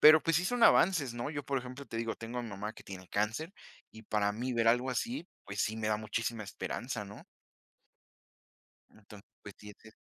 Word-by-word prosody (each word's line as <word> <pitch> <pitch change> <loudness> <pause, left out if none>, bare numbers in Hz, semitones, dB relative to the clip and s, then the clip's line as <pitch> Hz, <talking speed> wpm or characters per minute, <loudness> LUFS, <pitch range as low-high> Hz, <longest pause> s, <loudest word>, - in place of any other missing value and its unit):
pero, 155 +1 +10
pues, 165 -2 +3
sí 175 - +2
son 245 +4 0
avances, 155 -10 +5
¿no?, 120 +5 -3
yo, 145 -2 -3
por 140 -1 +1
ejemplo, 125 +2 -8
te 115 - -6
digo, 115 0 -1
tengo 115 +2 -6
a - - -1
mi 115 - -6
mamá 105 +3 -5
que - - -12
tiene 95 -2 -9
cáncer 115 - -1 0.4
y 110 - -12
para 105 -1 +1
mí 125 +4 -2
ver 115 -1 +3
algo 125 +3 +3
así, 235 - -2 0.2
pues, 100 0 -1
sí 110 +1 -1
me 110 -1 0
da 105 - +2
muchísima 110 +1 -2
esperanza, 105 +2 -4
¿no? 105 - -11 1.7
Entonces, 105 -1 -14
pues, 105 - -9
si 105 - -10
es 105 - -15
eso. 110 - -14
115 Hz, 215 wpm, -33 LUFS, 105-135 Hz, 1.7 s, pero